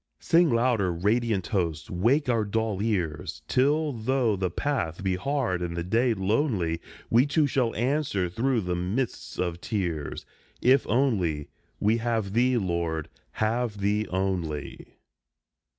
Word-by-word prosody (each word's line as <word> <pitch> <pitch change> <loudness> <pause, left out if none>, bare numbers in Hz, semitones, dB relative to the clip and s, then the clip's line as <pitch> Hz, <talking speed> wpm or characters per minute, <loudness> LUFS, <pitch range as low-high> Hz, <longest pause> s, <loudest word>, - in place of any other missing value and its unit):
Sing 170 0 +4
louder, 115 -6 +2
radiant 105 +3 +1
host, 85 -6 -2
wake 120 - +2
our 115 -3 +2
dull 105 -1 -1
ears, 90 -9 -2
Till, 145 +3 +2
though 120 -1 +1
the 95 -1 -1
path 90 - -2
be 95 -1 +1
hard 120 -4 -1
and 85 -1 -3
the 85 - -1
day 115 +6 +2
lonely, 95 - 0 0.3
We, 120 +5 +5
too, 145 +1 +3
shall 125 -4 0
answer 125 -6 0
through 115 +6 0
the 90 -2 -2
mists 100 +9 -3
of 85 -1 -2
tears, 85 -9 -3 0.3
"If 130 +2 +4
only 100 - +1 0.3
we 110 +3 +3
have 110 -4 -1
Thee, 125 +2 +3
Lord, 85 -5 -1 0.2
have 110 0 -1
Thee 105 +2 +1
only." 90 -6 -3
105 Hz, 135 wpm, -27 LUFS, 90-125 Hz, 0.3 s, We